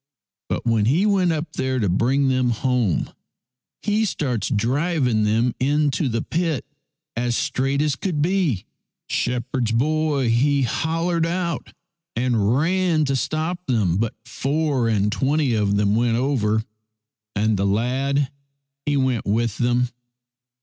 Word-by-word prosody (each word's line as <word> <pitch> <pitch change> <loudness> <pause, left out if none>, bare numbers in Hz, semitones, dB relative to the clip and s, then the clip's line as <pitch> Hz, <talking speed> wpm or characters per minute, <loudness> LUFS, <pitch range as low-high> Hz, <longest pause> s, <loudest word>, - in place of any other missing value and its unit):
But - - -2
when 115 -3 +2
he 155 - +3
went 190 -4 +3
up 160 +1 -3
there 130 0 -1
to 110 -5 +1
bring 130 +10 +2
them 130 -1 +2
home, 120 - 0 0.7
he 210 +1 +1
starts 135 - -1
driving 125 0 +1
them 115 +3 +2
into 145 +1 +1
the 115 0 -1
pit 165 -4 -1 0.5
as 120 0 0
straight 135 +2 0
as 150 -2 0
could 165 0 -2
be. 165 - +1 0.4
Shepherd's 125 -1 -1
boy 145 +1 +1
he 140 +4 +3
hollered 165 +6 0
out 170 0 -3 0.4
and 115 -2 +1
ran 170 0 +2
to 135 -1 0
stop 160 +6 -2
them, 105 -9 +1
but 115 +1 -1
four 135 -1 0
and 105 -1 +1
twenty 140 +1 +1
of 105 -2 +1
them 100 0 +2
went 115 0 +2
over, 110 -5 +1 0.7
and 110 +1 +2
the 100 0 0
lad 130 +6 0 0.6
he 145 -1 +2
went 130 -5 0
with 115 +1 0
them. 120 0 +2
130 Hz, 135 wpm, -22 LUFS, 115-155 Hz, 0.7 s, he